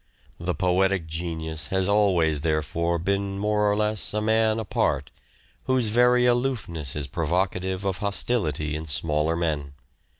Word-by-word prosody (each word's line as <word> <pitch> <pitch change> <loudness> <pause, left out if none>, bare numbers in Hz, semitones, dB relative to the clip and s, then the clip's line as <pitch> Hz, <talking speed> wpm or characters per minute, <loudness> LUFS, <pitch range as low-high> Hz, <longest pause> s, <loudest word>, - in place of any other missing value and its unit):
The 85 +1 -2
poetic 95 0 +1
genius 80 -2 -4
has 95 +1 0
always, 90 -8 +2
therefore, 80 +2 0
been 100 +3 -1
more 105 0 +1
or - - +1
less 105 0 0
a - - +2
man 110 0 +2
apart, 110 - -1 0.5
whose 130 -4 +2
very 125 +2 +4
aloofness 120 - -1
is 75 -2 -2
provocative 90 +6 -1
of 95 -1 -1
hos 100 -1 -1
tility 75 - -1
in 80 +1 -4
smaller 75 +2 0
men. 75 -4 -2
90 Hz, 140 wpm, -25 LUFS, 80-105 Hz, 0.5 s, very